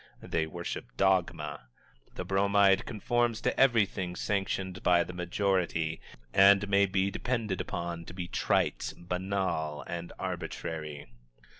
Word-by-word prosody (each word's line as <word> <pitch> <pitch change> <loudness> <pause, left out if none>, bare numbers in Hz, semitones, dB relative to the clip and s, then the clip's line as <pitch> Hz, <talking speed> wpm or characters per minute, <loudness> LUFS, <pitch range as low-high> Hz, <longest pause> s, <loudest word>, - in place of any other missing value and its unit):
They 80 -1 -1
worship 85 -7 -6
dogma. 85 -8 +1 0.5
The - - -4
Bromide 100 0 +3
conforms 120 +1 0
to - - 0
everything 105 -8 +3
sanctioned 95 -2 -2
by 90 -1 +4
the 90 - -8
majority, 90 -3 0 0.3
and 100 +1 +6
may 100 0 +4
be 95 +1 +1
depended 110 -5 -2
upon 85 -1 -4
to - - -9
be 90 -2 -4
trite, - - 0
banal 90 -4 -2
and 85 0 -5
arbitrary. 75 -3 -5
95 Hz, 120 wpm, -30 LUFS, 85-100 Hz, 0.5 s, and